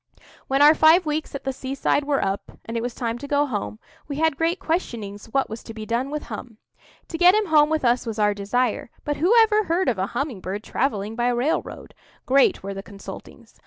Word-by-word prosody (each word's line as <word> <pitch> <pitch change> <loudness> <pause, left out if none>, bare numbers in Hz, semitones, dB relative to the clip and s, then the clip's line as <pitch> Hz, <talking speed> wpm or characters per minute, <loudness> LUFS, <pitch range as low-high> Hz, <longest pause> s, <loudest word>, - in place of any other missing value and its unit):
When 270 +2 +3
our 300 +1 +8
five 320 +3 +5
weeks 305 -1 -3
at 275 - -6
the 270 - -2
seaside 275 +2 -1
were 285 -5 +1
up, 195 +1 -4
and 230 - -6
it 230 - -1
was 245 0 -4
time 235 -1 -3
to 285 - -7
go 290 0 +2
home, 105 - -4 0.3
we 285 - -4
had 320 0 +1
great 330 +4 0
questionings 225 - -3
what 270 +4 0
was 220 +2 -7
to 225 - -10
be 215 -1 -6
done 235 +4 -1
with 300 +1 -4
Hum. 230 -4 -8 0.5
To 325 - -5
get 360 +2 +7
him 430 0 +2
home 305 -4 +4
with 315 -4 0
us 240 0 +2
was 225 -1 -4
our 210 -1 +3
desire; 220 +5 -1 0.2
but 290 -1 -1
who 345 +7 +2
ever 430 -1 +2
heard 350 +3 0
of 230 -7 +1
a 190 - 0
humming 275 -9 -3
bird 195 +3 -5
travelling 215 -5 -2
by 240 +1 0
railroad? 245 +6 -2 0.3
Great 270 -5 +3
were 195 0 -4
the 195 - -6
consultings. 200 0 -12
265 Hz, 225 wpm, -23 LUFS, 220-300 Hz, 0.5 s, our